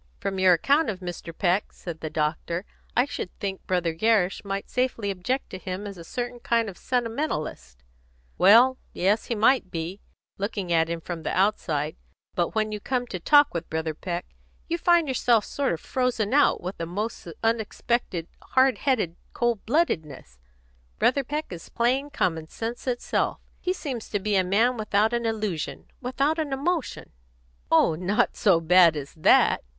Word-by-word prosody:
"From 195 -1 -3
your 185 -1 +6
account 280 - +3
of 195 -4 -4
Mr. 175 -2 -6
Peck." 180 +3 0
said 170 -3 -8
the 155 - -4
doctor, 160 +4 -2 0.3
"I 245 - +5
should 280 - -5
think 195 -1 -4
Brother 175 -3 0
Gerrish 195 +1 +2
might 195 0 -4
safely 250 -5 -1
object 245 +9 -3
to 185 - -6
him 185 +2 -5
as 200 -1 -6
a 170 - -10
certain 245 +6 -5
kind 230 -1 +1
of 190 - -9
sentimentalist." 225 - -3 0.6
"Well, 235 +7 +6
yes, 205 +4 +1
he 235 - -2
might, 225 +2 +4 0.7
looking 195 -3 -2
at 165 0 +3
him 170 0 -3
from 170 0 -6
the - - -3
outside. 160 -7 0 0.4
But 175 +3 -1
when 215 -1 +1
you 210 - -4
come 250 +3 -1
to 190 -6 -6
talk 290 - +5
with 170 - -4
Brother 160 0 -2
Peck, 175 +2 -4 0.4
you 340 +1 -1
find 345 -2 +4
yourself 240 -4 +2
sort 280 -1 -1
of 165 - -2
frozen 250 -4 -1
out 285 0 +4
with 185 +2 -6
a 165 - -3
most 205 +3 -4 0.2
unexpected, 225 -5 -1
hard 260 0 +2
headed 220 - 0 0.2
cold 240 -4 0
bloodedness. 155 - -1 0.6
Brother 275 - +2
Peck 300 +1 -4
is 165 - -9
plain 255 +5 +1
common 165 - -1
sense 230 +8 -6
itself. 245 -1 -1 0.2
He 365 - -1
seems 270 -11 -5
to 205 - -1
be 205 +1 0
a 190 - +4
man 225 +7 +2
without 215 +1 +1
an 235 -1 0
illusion, 210 -8 -3
without 275 +5 0
an 295 -3 -1
emotion." 315 +2 -2 0.6
"Oh, 165 0 +4
not 190 +8 0
so 195 -7 +4
bad 170 0 +6
as 140 -1 -6
that!" 160 - +4
205 Hz, 170 wpm, -26 LUFS, 175-250 Hz, 0.7 s, your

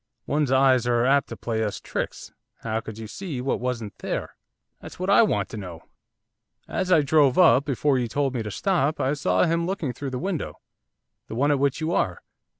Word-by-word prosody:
'One's 145 -2 0
eyes 130 -2 +4
are 120 0 +2
apt 140 0 +3
to - - -7
play 110 -1 -2
us 105 - -3
tricks; - - -5 0.3
how 110 -1 -2
could 110 -1 -9
you 110 - -7
see 145 - -6
what 130 +2 -1
wasn't 115 -5 -3
there?' - - -4 0.4
'That's - - -11
what 185 +2 -1
I 200 - +7
want 220 - +1
to - - -7
know. 90 -5 -8 0.8
As 185 0 -2
I 160 -4 +5
drove 140 -2 +3
up, 145 -7 +6
before 140 0 +1
you 120 - -1
told 135 +3 -1
me 120 - -2
to 105 - -5
stop, 160 - 0
I 135 - +1
saw 95 -11 +1
him 170 +1 +1
looking 170 -9 -2
through 135 +3 -5
the 130 - -4
window, 180 +2 -4 0.7
the - - -6
one 140 +5 +2
at 145 - +2
which 140 +2 0
you 160 +1 -1
are. 90 - -1
135 Hz, 210 wpm, -25 LUFS, 115-155 Hz, 0.8 s, I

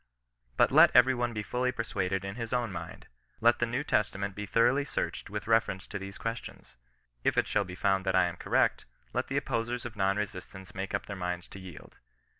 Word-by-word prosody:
But - - +5
let - - +8
every 125 +2 +7
one 120 -1 -1
be 105 -2 -3
fully 125 +5 0
persuaded 95 -5 -2
in 100 - -4
his 115 +1 -5
own 120 -3 0
mind. 90 - -7 0.3
Let 120 +1 +4
the 120 - +1
New 120 +5 -1
Testament 100 -5 0
be 105 +1 -6
thoroughly 120 +7 +3
searched 140 - -3
with - - -4
reference 110 -4 +2
to 100 - -5
these 95 0 -7
questions. 115 - -6 0.5
If - - +1
it - - +4
shall 105 -1 +1
be 90 0 -8
found 95 0 +1
that 95 - +2
I 95 - +5
am 85 - -4
correct, - - +1 0.3
let - - -1
the - - -1
opposers 120 +2 -2
of 115 -2 -6
non 100 0 +1
resistance 95 -2 -6
make 95 +1 -3
up 100 - -3
their 100 - -6
minds 90 -1 -3
to 100 - -10
yield. 95 -4 -12
105 Hz, 215 wpm, -30 LUFS, 95-120 Hz, 0.5 s, let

